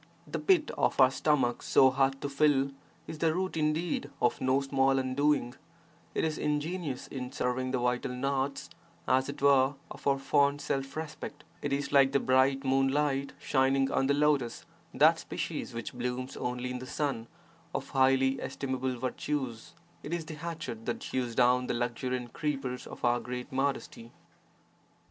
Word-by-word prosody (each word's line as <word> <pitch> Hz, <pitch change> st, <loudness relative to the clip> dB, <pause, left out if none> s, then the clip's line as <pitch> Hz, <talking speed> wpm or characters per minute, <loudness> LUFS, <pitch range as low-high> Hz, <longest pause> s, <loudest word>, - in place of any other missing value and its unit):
The -, -, -4 dB
pit 360 Hz, -6 st, +3 dB
of -, -, +1 dB
our 130 Hz, -1 st, +7 dB
stomach 135 Hz, -4 st, +1 dB
so 130 Hz, -1 st, +5 dB
hard 135 Hz, 0 st, +1 dB
to -, -, -2 dB
fill 140 Hz, -1 st, +2 dB, 0.3 s
is 155 Hz, -, -8 dB
the 160 Hz, -1 st, +2 dB
root 185 Hz, +1 st, -2 dB
indeed 155 Hz, -1 st, 0 dB
of 120 Hz, -, +1 dB
no 130 Hz, +1 st, +3 dB
small 135 Hz, -1 st, +2 dB
undoing: 130 Hz, -1 st, +1 dB, 0.6 s
it -, -, +1 dB
is 155 Hz, -1 st, -1 dB
ingenious 150 Hz, -1 st, -2 dB
in 125 Hz, -2 st, -5 dB
severing 130 Hz, -1 st, -1 dB
the 130 Hz, -, 0 dB
vital 125 Hz, +1 st, 0 dB
knots, 135 Hz, +2 st, -2 dB, 0.4 s
as 130 Hz, +1 st, +2 dB
it 140 Hz, -1 st, -6 dB
were, 140 Hz, 0 st, +5 dB, 0.2 s
of -, -, -7 dB
our 140 Hz, -1 st, +4 dB
fond 140 Hz, +1 st, +2 dB
self 135 Hz, 0 st, -3 dB
respect; 155 Hz, -1 st, -6 dB, 0.2 s
it 145 Hz, -, -2 dB
is 140 Hz, 0 st, -1 dB
like 140 Hz, -1 st, +5 dB
the 140 Hz, -, +4 dB
bright 130 Hz, +1 st, +3 dB
moonlight 135 Hz, +1 st, +1 dB
shining 135 Hz, 0 st, +2 dB
on 135 Hz, -, +2 dB
the 140 Hz, -, +3 dB
lotus 145 Hz, -5 st, +1 dB, 0.3 s
(that -, -, +5 dB
species -, -, -4 dB
which 115 Hz, -1 st, -6 dB
blooms 125 Hz, +1 st, -4 dB
only 125 Hz, 0 st, -3 dB
in 125 Hz, -, -4 dB
the 130 Hz, -, -8 dB
sun) 135 Hz, -7 st, -2 dB, 0.5 s
of -, -, -3 dB
highly 135 Hz, 0 st, +3 dB
estimable 130 Hz, -2 st, -3 dB
virtues; 130 Hz, -1 st, -3 dB, 0.3 s
it 150 Hz, -, -7 dB
is 165 Hz, -2 st, -4 dB
the 155 Hz, -, -7 dB
hatchet 150 Hz, -8 st, -6 dB
that 120 Hz, -, -2 dB
hews 125 Hz, -3 st, -2 dB
down 125 Hz, 0 st, +3 dB
the -, -, -1 dB
luxuriant 120 Hz, 0 st, -2 dB
creepers 135 Hz, -4 st, -3 dB
of -, -, -5 dB
our 120 Hz, 0 st, +3 dB
great 125 Hz, +3 st, -6 dB
modesty. 135 Hz, -3 st, -2 dB
135 Hz, 165 wpm, -30 LUFS, 125-145 Hz, 0.6 s, our